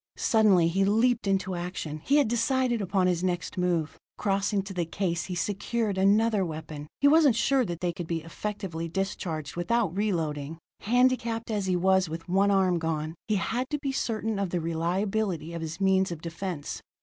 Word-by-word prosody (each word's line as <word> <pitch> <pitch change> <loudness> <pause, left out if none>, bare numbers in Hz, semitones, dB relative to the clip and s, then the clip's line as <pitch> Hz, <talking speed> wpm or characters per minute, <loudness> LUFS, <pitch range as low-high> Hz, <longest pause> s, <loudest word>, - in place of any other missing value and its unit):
Suddenly 205 -7 +4
he 190 +4 +1
leaped 225 +3 +2
into 190 -1 0
action; 175 -3 -4
he 280 - +2
had 290 -5 +4
decided 240 0 +1
upon 190 -1 +1
his 180 -1 +1
next 180 -1 -2
move. 175 -4 -1 0.2
Crossing 200 0 0
to 195 0 -7
the 180 -2 0
case 170 0 -2
he 180 - -4
secured 205 +3 -1
another 205 +2 +3
weapon. 155 -3 -6
He 285 - +6
wasn't 295 -4 +5
sure 265 +3 +2
that 175 -3 -5
they 175 -1 0
could 175 -2 -6
be 165 -2 -2
effectively 170 -2 -5
discharged 165 -5 -3
without 195 +1 0
re 210 +1 +1
loading; 155 -3 -3 0.2
handicapped 235 -1 +1
as 205 -3 -1
he 185 - +2
was 190 0 +3
with 165 +1 -6
one 195 +3 +3
arm 190 -3 +3
gone, 160 -1 -2
he 215 - +1
had 245 +6 -1
to 295 - -1
be 275 -1 -3
certain 225 -5 -2
of 200 -2 -1
the 175 - -1
reliability 170 +1 -1
of 170 - -5
his 160 +1 -5
means 190 -1 +2
of 170 - -5
defense. 170 -1 -5
190 Hz, 185 wpm, -27 LUFS, 170-215 Hz, 0.2 s, He